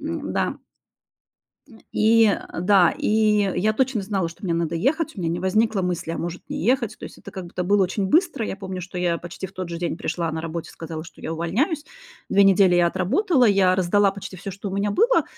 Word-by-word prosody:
М-да. - - -2 1.1
М, 225 -4 -17
и, 225 +1 +4
э, 200 - -2
да, 185 -2 +5
и - - -2 0.5
я 215 +3 +1
точно 260 -2 0
знала, 195 -3 -1
что 165 - -16
мне 175 - 0
надо 170 -1 -1
ехать, 310 - 0
у - - -8
меня 165 - -1
не 170 - -2
возникло 205 +2 +1
мысли: 175 -2 -2
"А - - -4
может 175 +1 -5
не - - -4
ехать?" 235 -3 +1
То - - -15
есть - - -11
это - - -11
как 190 -2 -7
будто 175 +1 -4
было 200 +2 +3
очень 190 +2 -1
быстро. 325 - +2
Я - - -4
помню, 190 -2 -6
что 180 0 -8
я 175 -1 0
почти 175 +3 -7
в - - -17
тот 185 -2 -5
же 170 - -4
день 170 -1 -2
пришла 165 -2 -2
на 160 0 -4
работе 165 0 -5
сказала, 160 -1 -7
что 165 - -15
я - - -4
увольняюсь. 250 - -1 0.4
Две 200 - +5
недели 195 -2 +5
я 175 -1 +4
отработала, 250 - +2
я 195 -3 +4
раздала 195 +2 +3
почти 195 -1 -9
всё, 195 +2 -7
что 200 +2 -6
у 190 - -6
меня 200 +1 0
было, 480 - +3
190 Hz, 225 wpm, -23 LUFS, 175-215 Hz, 1.1 s, да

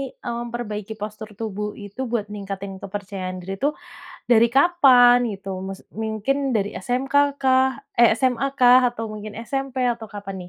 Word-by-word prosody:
eee, 240 - -6
memperbaiki 225 -3 -5
postur 215 +1 -7
tubuh 210 -1 -3 0.2
itu 205 +4 -12
buat 230 -4 0
ningkatin 195 -1 -6
kepercayaan 190 -2 -6
diri 195 +2 -5
tuh 295 +2 +2 0.6
dari 235 -1 +6
kapan 265 -6 +6
gitu? 195 0 -9 0.2
Maksud 195 0 -8 0.2
mungkin 220 +5 -1 0.2
dari 200 -1 0
SMK 255 +2 -3 0.3
kah, 260 0 +4 0.3
eh, 235 - +7
SMA 255 +1 +1
kah 250 0 +7
atau 225 -1 -5
mungkin 215 0 -7
SMP 270 0 -3 0.2
atau 230 -1 -10
kapan 200 -1 -6
220 Hz, 150 wpm, -23 LUFS, 205-250 Hz, 0.6 s, eh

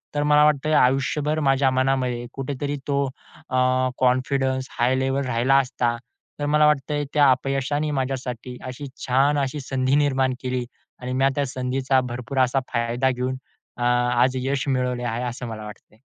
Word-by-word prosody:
तर 145 - +1
मला 150 0 +5
वाटतंय 150 0 +2
आयुष्यभर 145 +3 +2
माझ्या 135 0 +3
मनामध्ये 130 -2 0
कुठेतरी 140 +1 -3
तो 140 -1 +1 0.5
अ, 130 0 +2
कॉन्फिडन्स 130 +1 +1
हाय 125 +2 +3
लेव्हल 135 +1 0
राहिला 125 +2 +2
असता, 125 -2 0 0.4
तर 145 - -1
मला 150 +1 +4
वाटतंय 150 0 +1
त्या 145 -2 +5
अपयशाने 135 +3 -1
माझ्यासाठी 130 -2 -4
अशी 130 +3 -6 0.2
छान 135 +3 +3
अशी 135 +1 -2
संधी 130 0 0
निर्माण 135 -3 +2
केली 125 -1 -2 0.4
आणि 125 0 -4
मी 135 +1 +2
त्या 145 - +1
संधीचा 130 +1 0
भरपूर 125 +2 -4
असा 130 +2 +1
फायदा 120 +3 +1
घेऊन 130 +1 -2 0.4
अ, 120 - -3
आज 120 +1 +3
यश 135 +1 -1
मिळवले 125 -2 0
आहे, 120 0 -2
असं 125 0 -5
मला 110 -1 -6
वाटतंय. 105 0 -13
130 Hz, 155 wpm, -23 LUFS, 125-140 Hz, 0.5 s, मला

